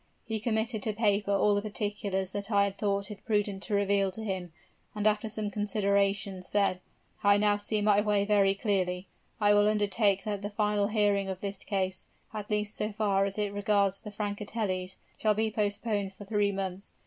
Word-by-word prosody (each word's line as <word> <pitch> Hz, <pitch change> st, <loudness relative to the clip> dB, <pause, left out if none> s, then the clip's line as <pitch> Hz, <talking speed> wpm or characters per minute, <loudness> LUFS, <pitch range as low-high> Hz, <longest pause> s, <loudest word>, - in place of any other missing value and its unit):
He 220 Hz, -1 st, -2 dB
committed 220 Hz, 0 st, -1 dB
to 215 Hz, +1 st, -1 dB
paper 205 Hz, -2 st, +1 dB
all 200 Hz, +1 st, +3 dB
the 205 Hz, -, +1 dB
particulars 205 Hz, -2 st, -2 dB
that 205 Hz, 0 st, -4 dB
I 200 Hz, -2 st, +4 dB
had 200 Hz, -1 st, -1 dB
thought 200 Hz, -1 st, -1 dB
it 205 Hz, -, -9 dB
prudent 205 Hz, -3 st, 0 dB
to 210 Hz, -, -1 dB
reveal 200 Hz, -1 st, +2 dB
to 220 Hz, +4 st, -7 dB
him, 190 Hz, -4 st, -3 dB, 0.4 s
and 210 Hz, 0 st, -2 dB
after 215 Hz, +1 st, +2 dB
some 215 Hz, -1 st, -3 dB
consideration, 200 Hz, -2 st, 0 dB
said, 195 Hz, -1 st, +1 dB, 0.4 s
'I 200 Hz, 0 st, +6 dB
now 205 Hz, 0 st, +3 dB
see 210 Hz, 0 st, -1 dB
my 205 Hz, -1 st, +4 dB
way 205 Hz, -1 st, +2 dB, 0.3 s
clearly. 185 Hz, -3 st, 0 dB, 0.3 s
I 205 Hz, -1 st, +5 dB
will 205 Hz, 0 st, +5 dB
undertake 205 Hz, -1 st, +2 dB
that 205 Hz, -2 st, -3 dB
the 205 Hz, -, -3 dB
final 210 Hz, -1 st, +1 dB
hearing 205 Hz, -2 st, +2 dB
of 190 Hz, -1 st, -5 dB
this 200 Hz, -1 st, -5 dB
case, 190 Hz, -2 st, -2 dB, 0.3 s
at 210 Hz, -1 st, -5 dB
least 210 Hz, 0 st, -1 dB
so 210 Hz, +1 st, -2 dB
far 200 Hz, -2 st, +1 dB
as 195 Hz, +1 st, -3 dB
it 205 Hz, -1 st, -1 dB
regards 200 Hz, -1 st, +1 dB
the 210 Hz, -, -7 dB
Francatellis, 205 Hz, -2 st, -3 dB, 0.2 s
shall 215 Hz, -1 st, +2 dB
be 220 Hz, +1 st, +1 dB
postponed 205 Hz, -1 st, -1 dB
for 205 Hz, -, -11 dB
three 205 Hz, 0 st, +1 dB
months. 195 Hz, 0 st, -5 dB
205 Hz, 185 wpm, -29 LUFS, 195-210 Hz, 0.4 s, I